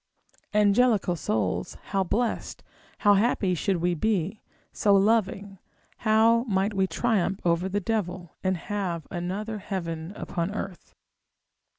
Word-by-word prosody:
Angelical 210 -2 +3
souls, 95 - -1 0.2
how 195 -1 +2
blessed, 225 +5 -2 0.3
how 205 -1 +5
happy 200 -2 +2
should 185 +2 0
we 175 +1 +1
be, 200 +2 -1 0.3
so 205 -1 +3
loving, 200 -1 +1 0.4
how 225 +1 +4
might 200 -1 0
we 190 -1 +1
triumph 200 -4 0
over 170 +2 +2
the 205 +2 0
devil, 185 -5 -3
and 185 -1 +1
have 180 -3 -3
another 195 +5 -3
heaven 170 -4 -4
upon 180 +2 -3
earth! 195 -3 -7
195 Hz, 120 wpm, -26 LUFS, 175-210 Hz, 0.4 s, how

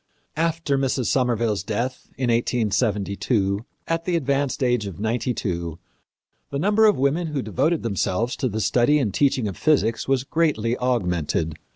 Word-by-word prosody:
After 165 -3 0
Mrs. 130 -2 0
Somerville's 115 -6 +1
death, 120 +6 -3
in 125 -2 +1
1872, 105 -3 0 0.2
at 165 0 -1
the 180 - 0
advanced 140 -3 0
age 120 -4 +1
of 95 -2 -8
ninety 115 +4 -1
two, 85 -8 -3 0.7
the 140 - -3
number 205 +7 +4
of 210 - +3
women 145 +6 +1
who 145 -4 -2
devoted 140 - 0
themselves 110 +2 -1
to 130 - 0
the 110 +1 -2
study 125 +7 +3
and 115 -9 0
teaching 135 -5 +2
of 95 - -5
physics 115 -7 +1
was 135 -1 +2
greatly 135 -7 +1
augmented. 90 - 0
125 Hz, 155 wpm, -23 LUFS, 105-140 Hz, 0.7 s, number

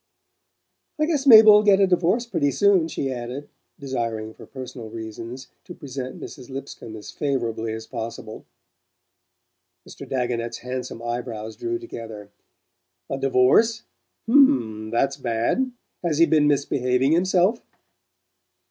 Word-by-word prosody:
"I 305 - +3
guess 295 -4 -1
Mabel'll 220 -3 +9
get 200 -2 +4
a 195 - +6
divorce 185 +6 +1
pretty 145 -11 0
soon," 190 +3 +3
she 135 -4 -3
added, 125 +3 -6 0.3
desiring, 115 -5 -4
for - - -14
personal 130 -3 -8
reasons, 115 +3 -8 0.2
to - - -10
present 130 -2 -7
Mrs. 130 -4 -10
Lipscomb 135 -4 -8
as 105 - -9
favourably 120 -6 -2
as 110 0 -7
possible. 110 -1 -7 1.4
Mr. - - -11
Dagonet's 120 -3 -2
handsome 125 -2 -6
eye 120 +1 -2
brows 110 -2 -7
drew 355 0 -3
together. 115 - -9 0.8
"A 135 - -2
divorce? 135 - +3 0.4
H'm 120 - +3
that's 135 +4 0
bad. 120 - -1 0.3
Has 165 -4 0
he 165 - +6
been 155 -3 +3
misbehaving 135 -2 +1
himself?" 185 +5 +2
130 Hz, 125 wpm, -23 LUFS, 115-175 Hz, 1.4 s, Mabel'll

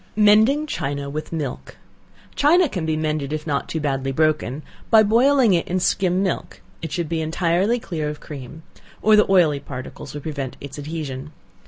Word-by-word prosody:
Mending 215 +8 +5
China 140 - -3
with 155 +1 -5
Milk. 150 -6 -5 0.6
China 335 +4 +4
can 180 - -4
be 155 -1 0
mended 155 -2 -2
if 155 0 -3
not 145 -3 -2
too 160 - -2
badly 135 -2 -1
broken, 155 -1 0 0.3
by 220 -1 +7
boiling 240 +1 +4
it 170 - +1
in 185 +1 0
skim 185 +1 +1
milk, 190 - -3 0.2
it 165 - -5
should 170 -1 -2
be 160 +1 -2
entirely 175 +8 +1
clear 155 -8 -3
of 150 0 -6
cream, 145 +2 -9 0.4
or 215 +1 +6
the 210 -2 +4
oily 165 -7 +4
particles 135 0 -8
will 145 - -5
prevent 140 -4 -5
its 140 +1 -8
adhesion. 145 -2 -5
160 Hz, 175 wpm, -22 LUFS, 145-195 Hz, 0.6 s, by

